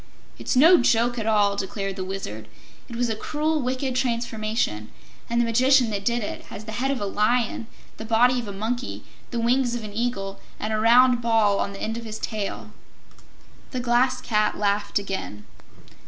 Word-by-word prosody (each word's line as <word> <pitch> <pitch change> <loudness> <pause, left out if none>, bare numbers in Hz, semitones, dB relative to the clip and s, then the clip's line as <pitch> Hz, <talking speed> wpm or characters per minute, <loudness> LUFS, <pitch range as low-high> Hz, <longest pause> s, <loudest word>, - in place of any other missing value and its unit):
"It's - - -2
no 325 +8 +7
joke 240 0 +2
at 220 - -3
all," 205 -2 +3
declared 195 0 -4
the 190 - -4
Wizard. 150 - -6 0.4
"It 235 - -7
was 245 +1 0
a 225 - -1
cruel, 305 +6 -1
wicked 255 +1 -2
transformation, 225 - -1 0.4
and 235 0 +1
the 240 - +3
Magician 250 +1 +4
that 200 -1 -3
did 235 +1 0
it - - -6
has 215 - -9
the 220 - -6
head 250 +5 -1
of 275 -2 -1
a 205 - -2
lion, 220 +3 0 0.3
the - - -6
body 240 +3 +3
of 235 - -6
a - - -4
monkey, 230 +6 -4 0.3
the 240 - -3
wings 240 +1 +1
of 235 - -5
an 210 -1 -7
eagle 205 -4 -3 0.2
and 215 +1 -2
a 215 - 0
round 245 +2 +5
ball 225 -4 +3
on 200 - -1
the 195 - -9
end 225 +1 -2
of 230 - -10
his 215 -1 -6
tail." 215 -2 -4 1.0
The 255 - -4
Glass 245 +1 +2
Cat 215 -2 +1
laughed 205 0 0
again. 190 - -4
230 Hz, 190 wpm, -24 LUFS, 205-245 Hz, 1.0 s, no